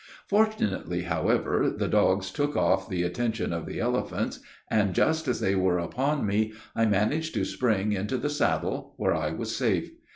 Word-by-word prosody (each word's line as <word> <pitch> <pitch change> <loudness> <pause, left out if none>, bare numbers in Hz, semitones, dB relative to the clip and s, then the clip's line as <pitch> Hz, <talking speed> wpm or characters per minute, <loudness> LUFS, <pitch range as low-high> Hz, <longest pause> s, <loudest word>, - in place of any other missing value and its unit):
Fortunately, 200 - +1
however, 80 -3 +1
the - - 0
dogs 95 0 +2
took 145 0 -1
off 95 +2 +2
the 90 -3 -1
attention 110 +3 -1
of 85 -1 -4
the - - -5
elephants; - - -1 0.3
and 100 -4 +1
just 160 - +2
as 125 - 0
they 95 - +1
were 95 -2 +2
upon 130 - -1
me, 110 +2 0 0.2
I 115 0 +3
managed 120 +10 +1
to 100 -3 +1
spring 105 -4 0
into 105 +6 -1
the 145 +3 -2
saddle, 150 - -1
where - - +1
I - - -1
was - - -4
safe. - - 0
105 Hz, 170 wpm, -27 LUFS, 95-130 Hz, 0.3 s, I